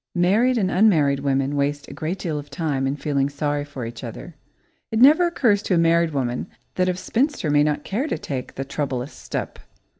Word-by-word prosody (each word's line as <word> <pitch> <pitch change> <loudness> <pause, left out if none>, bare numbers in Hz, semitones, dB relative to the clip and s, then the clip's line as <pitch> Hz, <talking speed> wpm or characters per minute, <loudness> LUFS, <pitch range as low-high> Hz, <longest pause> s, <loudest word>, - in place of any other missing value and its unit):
Married 215 +9 +3
and 190 -4 +1
unmarried 160 -9 +3
women 135 0 0
waste 145 0 -1
a - - -9
great 165 +5 -3
deal 160 -5 -3
of 145 - -10
time 145 -6 -1
in 135 - -1
feeling 140 -2 0
sorry 145 0 -2
for 140 -4 -7
each 115 +1 -8
other. 120 +8 -8 0.6
It 220 - -2
never 305 +9 +6
occurs 230 -12 +2
to 190 - 0
a - - +3
married 165 0 +3
woman 130 -1 -2 0.3
that 185 0 +1
a 180 - 0
spinster 240 - 0
may 145 0 +4
not 150 0 0
care 240 +10 -2
to - - -2
take 130 -3 -6
the 135 - -4
troublous 135 -2 -3
step. - - -5
150 Hz, 205 wpm, -23 LUFS, 140-190 Hz, 0.6 s, never